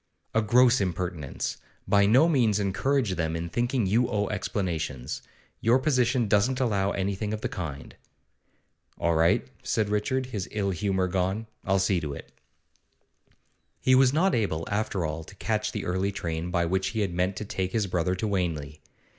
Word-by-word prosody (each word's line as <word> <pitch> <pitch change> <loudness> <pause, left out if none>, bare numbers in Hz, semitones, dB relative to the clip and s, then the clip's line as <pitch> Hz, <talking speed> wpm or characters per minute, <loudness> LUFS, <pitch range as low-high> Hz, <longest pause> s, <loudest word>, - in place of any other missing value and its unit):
'A 110 - +3
gross 120 +2 +4
impertinence! 90 -5 -3 0.3
By 100 0 +4
no 130 +10 +6
means 120 -10 +3
encourage 100 +4 +1
them 80 -1 -1
in 85 +1 -3
thinking 120 +2 0
you 115 +6 +2
owe 105 -2 0
explanations. 85 - -3 0.4
Your 115 +3 +4
position 130 -4 +2
doesn't 115 +6 +2
allow 100 -6 +1
anything 100 +2 -2
of 105 - -9
the - - -1
kind.' 75 -7 -6 1.0
'All 85 +1 +2
right,' 80 -4 +3
said 110 -2 0
Richard, 115 +6 0
his 105 -7 -5
ill 100 -2 -1
humour 95 +1 0
gone; 95 +4 -1 0.2
'I'll 95 0 +2
see 95 -1 +2
to 75 -3 -4
it.' - - -11 1.5
He 130 - +3
was 130 0 +6
not 180 +7 +2
able, 85 -8 -1
after 100 -4 -1
all, 80 +1 -4
to 100 - -14
catch 110 +1 -1
the 105 - -4
early 95 +3 0
train 85 -2 -3
by 85 -1 +1
which 95 +2 0
he 105 +3 -2
had 95 -4 -1
meant 90 +2 0
to 105 - -5
take 95 -2 -2
his 110 -1 +1
brother 90 0 0
to 100 +4 -2
Wanley. 80 -7 -2
100 Hz, 170 wpm, -27 LUFS, 90-110 Hz, 1.5 s, no